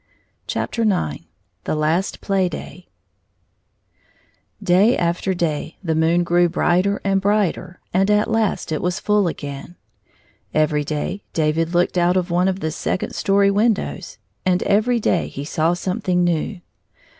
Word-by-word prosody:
90 230 - -2
IX 130 - 0 0.4
The - - -1
Last 160 +5 0
Play 190 -2 +1
day 175 +2 -9 1.8
DAY 200 +6 +4
after 175 +2 0
day 160 -2 -2
the 165 -3 0
moon 165 +2 +2
grew 175 0 +3
brighter 180 +3 +1
and 195 -1 +1
brighter, 200 -3 0
and 190 +2 +2
at 210 0 +3
last 225 -6 0
it 155 - -1
was 180 0 -1
full 210 -2 +2
again. 145 +1 -6 0.8
Every 150 -1 +2
day 155 +7 -3
David 165 +2 0
looked 175 +1 +2
out 175 +1 +3
of 180 -1 -1
one 180 +2 +2
of 190 0 -1
the 160 - -1
second 185 - -3
story 200 0 +2
windows, 215 +1 -1 0.3
and 185 -1 +1
every 230 +4 +2
day 185 -5 +1
he 140 - -7
saw 165 +2 +1
something 185 -1 -1
new. 175 +2 -1
180 Hz, 145 wpm, -21 LUFS, 165-200 Hz, 1.8 s, DAY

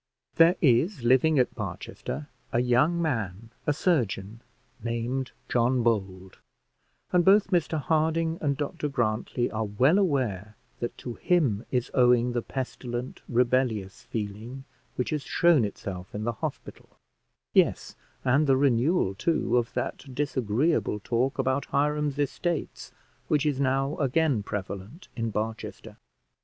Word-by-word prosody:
There 165 +2 +6
is 140 - +3
living 130 +6 +4
at 125 - +2
Barchester, 150 0 -6 0.2
a 120 - +2
young 125 +8 +3
man, 115 - -2 0.2
a - - +4
surgeon, 115 - 0 0.4
named 120 +3 -2 0.2
John 125 +1 +2
Bold, 95 -5 -1 0.7
and 180 -1 +4
both 195 +2 +5
Mr 165 -3 +1
Harding 160 +2 +1
and 140 -3 0
Dr 150 +1 -3
Grantly 120 -1 -1
are 110 0 -1
well 130 - +3
aware 115 - 0 0.2
that 120 - -4
to 120 - -6
him 130 - +1
is 125 -2 -1
owing 125 -1 +4
the 120 0 -1
pestilent 125 -1 -5
rebellious 120 -5 +1
feeling 110 +5 -6 0.3
which 125 - -2
has 150 -1 -1
shown 165 0 +3
itself 95 -3 -6
in 105 - -3
the 120 - 0
hospital; 110 - -7 0.6
yes, - - +2 0.3
and 140 +4 +3
the 135 -1 +4
renewal, 135 - +2
too, 155 - 0
of 120 -1 +1
that 130 -3 -4
disagreeable 130 -2 0
talk 125 +5 0
about 130 +2 0
Hiram's 150 0 0
estates 155 +4 -2 0.4
which 150 -1 +2
is 145 -3 0
now 135 +2 +1
again 140 -3 +2
prevalent 100 - -6
in 115 -2 -2
Barchester. 110 +1 -5
130 Hz, 130 wpm, -27 LUFS, 115-150 Hz, 0.7 s, There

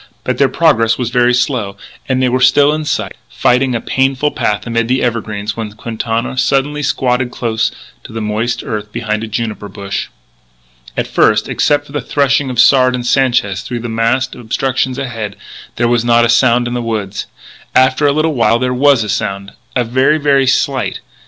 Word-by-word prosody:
But - - -2
their - - +4
progress 115 0 +2
was 120 -2 -3
very 125 -1 +3
slow; 120 -5 -1 0.3
and 130 0 +1
they - - +3
were 125 +1 0
still 140 +3 +5
in 155 0 -3
sight, - - -2
fighting 125 0 +1
a - - 0
painful 135 +4 0
path 105 -1 -1
amid 115 -1 -1
the 130 +2 +1
evergreens, 110 -3 -2
when 110 -2 -5
Quintana 115 +3 -3
suddenly 135 +3 +1
squatted 125 -3 0
close 115 -2 -1 0.3
to - - -11
the 115 - -5
moist 110 +2 -2
earth 105 -5 -5
behind 110 -1 -2
a - - -4
juniper 110 -2 -4
bush. 100 0 -5 0.9
At - - 0
first, 110 0 +2
except 145 -1 +1
for 140 - -15
the 145 - -3
threshing 140 -1 +1
of 125 - -5
Sard 130 -1 +5
and 125 -1 -4
Sanchez 120 -7 +1
through 120 +2 -5
the 120 - -5
massed 115 +3 0
obstructions 130 +2 -2
ahead, 115 -6 -4 0.4
there 120 - +1
was 120 -1 +2
not 120 0 +4
a - - 0
sound 120 0 +3
in 120 - -4
the 120 - -2
woods. 105 -4 -4 0.5
After 130 +3 +4
a - - +4
little 155 +2 +1
while 115 -2 +3
there 125 +1 -1
was 135 -2 +3
a - - -5
sound 100 -1 -3 0.3
very, 130 +5 +2
very 140 -3 +2
slight. 130 0 0
120 Hz, 185 wpm, -15 LUFS, 115-130 Hz, 0.9 s, still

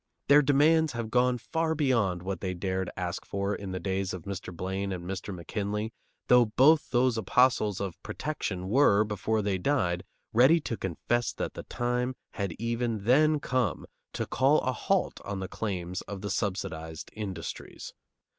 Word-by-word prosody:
Their 145 +1 +8
demands 150 +3 +4
have 115 -1 -4
gone 125 +1 +3
far 160 +7 -1
beyond 115 - +1
what 95 -2 -3
they 95 -2 -2
dared 95 0 -2
ask 90 -1 -3
for 100 +1 -2
in 100 -2 -5
the 95 - -3
days 95 0 -2
of 90 - -8
Mr. 95 -1 -5
Blaine 95 +3 -3
and 90 -2 -5
Mr. 95 +1 -4
McKinley, 105 +4 -3 0.3
though 125 -1 +6
both 140 +8 +4
those 125 -2 +2
apostles 110 -2 +3
of 95 -4 -5
"protection" 100 -11 -4
were, 105 -2 +5
before 110 +1 -1
they 100 -2 0
died, 90 -9 +1 0.3
ready 130 +9 +6
to 115 - -3
confess 115 +6 -1
that - - -4
the - - -6
time 125 +1 -1 0.2
had 100 -4 -3
even 115 -1 -2
then 150 +6 +4
come 130 -5 -1 0.3
to - - -2
call - - +3
a - - 0
halt - - 0
on 100 -1 -4
the 95 - -4
claims 90 -4 -3
of 100 -2 -6
the 100 -1 -3
subsidized 90 -6 -3
industries. 95 -6 -6
105 Hz, 165 wpm, -29 LUFS, 95-125 Hz, 0.3 s, Their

